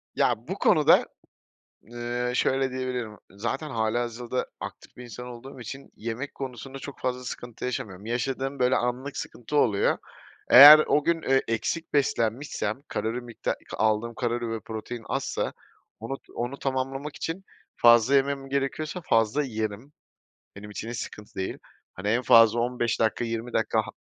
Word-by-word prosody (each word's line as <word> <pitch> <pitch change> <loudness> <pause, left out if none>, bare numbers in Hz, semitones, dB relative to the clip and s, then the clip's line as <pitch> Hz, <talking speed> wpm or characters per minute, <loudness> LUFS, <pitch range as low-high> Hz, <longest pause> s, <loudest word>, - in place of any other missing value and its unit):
Ya, - - +1
bu - - -3
konuda, - - +5 0.8
eee, 120 +1 -3
şöyle 135 +1 +1
diyebilirim, 125 -4 -4
zaten 115 +10 -3
hâlihazırda 120 +1 -2
aktif - - -9
bir 125 - -9
insan 125 +1 -8
olduğum 130 +3 -10
için 135 +3 -8
yemek 115 +5 -5
konusunda 135 +1 -7
çok 140 0 -9
fazla 125 0 -2
sıkıntı 120 -1 -7
yaşamıyorum. 105 -6 -5
Yaşadığım, 135 +4 -2
böyle, 125 +1 +3
anlık 125 +4 -2
sıkıntı 135 +5 -4
oluyor. 105 -8 +3 0.5
Eğer 145 +4 +12
o 150 - +3
gün, 170 +1 +1
ııı, 135 0 +3
eksik 160 +8 -2
beslenmişsem 125 -3 0
kalori 115 +3 -2
mikta 120 -1 -3 0.2
aldığım 110 +2 +1
kalori 120 -1 -2
ve 115 - -3
protein 110 +2 -7
azsa - - -2 0.5
onu 125 +5 -5 0.2
onu 125 +3 -3
tamamlamak 135 +2 -3
için 170 +4 -4 0.3
fazla 120 +3 +6
yemem 135 0 +1
gerekiyorsa 140 +5 -2
fazla 115 +3 +2
yerim. 110 +1 -4 0.7
Benim 105 +1 -9
için 105 +2 -6
hiç 120 - -5
sıkıntı 105 0 -8
değil. 95 - -4 0.4
Hani, 95 +3 -4
en 120 +4 +2
fazla 115 -1 +6
15 120 -1 -1
dakika 115 +1 +1
20 115 +1 -4
dakika 110 0 +1
ha - - -9
120 Hz, 145 wpm, -26 LUFS, 115-135 Hz, 0.8 s, Eğer